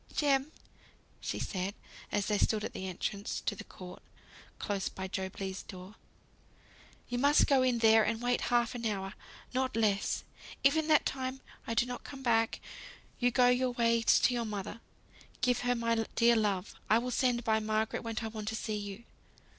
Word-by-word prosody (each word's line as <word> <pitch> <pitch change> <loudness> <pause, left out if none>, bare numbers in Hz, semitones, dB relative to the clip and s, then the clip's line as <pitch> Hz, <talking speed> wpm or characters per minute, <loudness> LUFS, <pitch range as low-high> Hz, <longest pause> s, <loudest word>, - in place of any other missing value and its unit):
"Jem!" 280 0 +2 0.7
said - - -3
she, 190 0 -2 0.4
as 205 - 0
they 210 -1 +1
stood 215 -1 +2
at - - -4
the 190 - -5
entrance 200 +2 -3
to 205 - -1
the 220 - -8
court, 180 -3 -11 0.6
close 200 -2 -2
by 190 0 -6
Job 190 0 -4
Legh's 190 -1 -4
door, 185 +2 -10 1.1
"you 245 0 -2
must 285 +3 +5
go 275 -2 +4
in 255 -2 +2
there 225 -1 +6
and 225 +1 0
wait 245 +1 +1
half 240 -1 +2
an 235 -2 -2
hour. 195 -2 -3 0.4
Not 260 -1 0
less. 210 -3 +1 0.4
If 275 +2 +5
in 315 -1 +1
that 310 -1 +5
time 260 0 -3 0.3
I 230 - -2
don't 245 +1 0
come 270 -1 -9
back, 225 -2 +2 0.6
you 245 - +4
go 245 0 +4
your 250 0 +2
ways 230 -1 +4
to 250 - +4
your 240 -1 0
mother. 210 0 -5 0.6
Give 250 -1 +2
her 245 0 +1
my 230 -1 +1 0.2
dear 235 0 +5
love. 205 -4 0 0.2
I 220 - +6
will 250 +2 -2
send 245 -1 +1
by 220 -1 +2
Margaret 215 0 -1
when 230 -1 -5
I - - -2
want 215 -1 -6
to 220 - -1
see 215 -1 -2
you." 205 +2 -6
230 Hz, 185 wpm, -32 LUFS, 205-245 Hz, 1.1 s, there